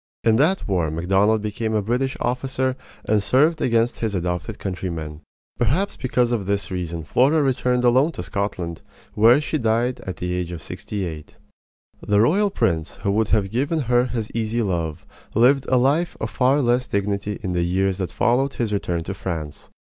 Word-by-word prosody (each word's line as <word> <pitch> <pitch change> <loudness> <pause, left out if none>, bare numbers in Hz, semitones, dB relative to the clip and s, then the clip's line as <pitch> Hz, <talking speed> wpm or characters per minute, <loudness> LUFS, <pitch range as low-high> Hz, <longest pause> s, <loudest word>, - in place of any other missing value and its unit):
In 110 -1 +4
that 165 +9 +2
war 90 -5 +1
Macdonald 95 +7 +2
became 110 +1 -2
a 105 - +2
British 125 +5 -1
officer 130 +1 -1 0.3
and 105 -1 +2
served 150 +9 +2
against 115 0 +1
his 110 -3 -1
adopted 90 +4 -3
countrymen. 85 -5 -5 0.4
Perhaps 155 - +1
because 125 -2 0
of 105 -6 -1
this 100 -1 -1
reason 85 -3 -4
Flora 140 - +3
returned 125 -2 +1
alone 130 +6 +4
to - - -5
Scotland, 90 -3 -3 0.3
where 115 +5 +6
she 155 +1 -2
died 120 +2 +1
at 95 -6 -6
the 90 0 -3
age 90 -1 -3
of 85 -2 -7
sixty 100 -3 -5
eight. 80 -3 -8 0.7
The 105 0 +2
royal 195 - +3
prince 85 - -1
who 100 - +1
would 110 +1 +1
have 100 -3 +1
given 145 +7 0
her 120 -1 +2
his 115 -3 -4
easy 115 +1 -1
love 85 -5 -2 0.3
lived 130 +4 +4
a 130 - +4
life 145 +7 +1
of - - -3
far 135 +3 +3
less 125 0 +1
dignity 100 0 -2
in 95 -3 -2
the 90 - +1
years 95 +2 0
that 95 - -3
followed 135 +3 +1
his 115 -3 -2
return 85 -4 -1
to 95 - -4
France. 80 -6 -6
110 Hz, 180 wpm, -22 LUFS, 95-125 Hz, 0.7 s, where